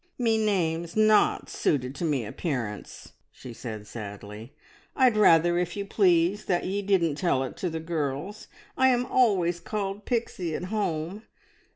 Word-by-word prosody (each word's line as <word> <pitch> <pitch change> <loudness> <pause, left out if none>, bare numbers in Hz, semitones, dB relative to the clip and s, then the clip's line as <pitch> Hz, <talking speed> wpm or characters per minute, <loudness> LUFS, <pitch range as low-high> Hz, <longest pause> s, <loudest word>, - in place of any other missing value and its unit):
"Me 230 -3 +2
name's 170 -6 0
not 215 0 +3
suited 130 -3 -1
to 145 - -6
me 145 -8 0
appearance," 115 -4 -5 0.2
she 125 - -11
said 110 -3 -7
sadly. 105 0 -9 0.4
"I'd 255 -5 +4
rather, 175 -4 +5
if 175 +2 -3
you 200 - -3
please, 185 -1 +2
that 175 -2 0
ye 195 +2 -2
didn't 180 -7 +1
tell 155 -8 +1
it 130 - -6
to 180 - -2
the 160 0 -4
girls. 160 +4 -4 0.3
I 260 - +4
am 250 -1 +2
always 190 -10 +2
called 200 +2 -4
Pixie 185 -9 -2
at - - -4
home. 180 -1 -2
175 Hz, 155 wpm, -27 LUFS, 145-205 Hz, 0.4 s, rather